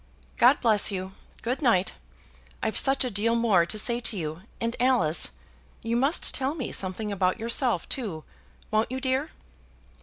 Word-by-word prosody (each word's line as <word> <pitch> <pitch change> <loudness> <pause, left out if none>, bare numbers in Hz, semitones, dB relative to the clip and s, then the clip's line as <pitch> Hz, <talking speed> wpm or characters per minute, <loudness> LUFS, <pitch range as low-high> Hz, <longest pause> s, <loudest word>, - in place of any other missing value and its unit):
God 250 +4 +5
bless 215 -4 +5
you! 190 -1 -5 0.3
good 250 +6 -2
night. 210 -9 +2 0.7
I've 220 -2 -1
such 270 0 +4
a 250 - -3
deal 220 +3 +1
more 210 -8 +2
to 215 - -1
say 235 +3 +1
to 235 -3 -2
you; 160 0 -5 0.2
and 230 0 -2
Alice, 210 -11 +3 0.5
you 230 +1 -2
must 275 +7 +1
tell 275 +3 -1
me 270 -7 -5
something 195 +3 -2
about 185 +1 0
yourself, 230 - 0
too; 195 - -5 0.5
won't 215 +2 0
you, 260 - -3
dear?" 265 +3 -1
230 Hz, 160 wpm, -26 LUFS, 190-255 Hz, 0.7 s, God